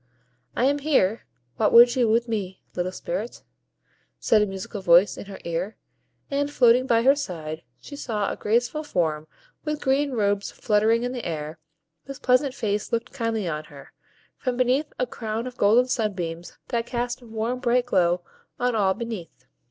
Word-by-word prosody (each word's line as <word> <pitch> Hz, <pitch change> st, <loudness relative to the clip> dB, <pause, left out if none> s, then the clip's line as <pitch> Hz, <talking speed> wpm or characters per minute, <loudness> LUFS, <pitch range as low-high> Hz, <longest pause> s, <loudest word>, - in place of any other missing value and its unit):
"I 245 Hz, -, +2 dB
am 285 Hz, +2 st, +2 dB
here, 235 Hz, -, +1 dB, 0.3 s
what 215 Hz, -, +2 dB
would 240 Hz, +1 st, +8 dB
you 245 Hz, -3 st, +2 dB
with 230 Hz, +2 st, +2 dB
me, 195 Hz, -5 st, -4 dB
little 180 Hz, +1 st, -2 dB
Spirit?" -, -, -5 dB, 0.8 s
said 215 Hz, -, +3 dB
a 210 Hz, -, +2 dB
musical 195 Hz, +1 st, -6 dB
voice 175 Hz, +2 st, +5 dB
in -, -, -8 dB
her 200 Hz, -, -8 dB
ear; 170 Hz, +5 st, -3 dB, 0.6 s
and, 285 Hz, +1 st, 0 dB
floating 255 Hz, -2 st, +4 dB
by 230 Hz, -2 st, +3 dB
her 270 Hz, +3 st, +6 dB
side, 160 Hz, -, -5 dB, 0.2 s
she 285 Hz, -, -10 dB
saw 215 Hz, -7 st, -2 dB
a -, -, -4 dB
graceful 240 Hz, +8 st, 0 dB
form, 160 Hz, -, -1 dB, 0.4 s
with 300 Hz, -1 st, -2 dB
green 275 Hz, +1 st, +1 dB
robes 205 Hz, -3 st, 0 dB
fluttering 220 Hz, +2 st, +2 dB
in 245 Hz, -, -2 dB
the 245 Hz, -2 st, -5 dB
air, 155 Hz, -1 st, -5 dB, 0.5 s
whose 275 Hz, 0 st, -7 dB
pleasant 255 Hz, 0 st, +2 dB
face 210 Hz, -3 st, -2 dB
looked 230 Hz, 0 st, -2 dB
kindly 230 Hz, -6 st, -2 dB
on 155 Hz, -1 st, -3 dB
her, 145 Hz, -3 st, -14 dB, 0.5 s
from 255 Hz, -3 st, -2 dB
beneath 255 Hz, +4 st, +1 dB
a 250 Hz, -, +1 dB
crown 225 Hz, -1 st, -4 dB
of 250 Hz, -1 st, -7 dB
golden 225 Hz, +5 st, +5 dB
sunbeams 180 Hz, -8 st, -3 dB
that 235 Hz, 0 st, -1 dB
cast 245 Hz, 0 st, -3 dB
a 240 Hz, -, -14 dB
warm, 225 Hz, +3 st, -2 dB
bright 245 Hz, -1 st, +2 dB
glow 175 Hz, -6 st, +2 dB, 0.4 s
on 245 Hz, 0 st, +1 dB
all 195 Hz, -3 st, +2 dB
beneath. 195 Hz, -, -7 dB
230 Hz, 175 wpm, -25 LUFS, 190-250 Hz, 0.8 s, would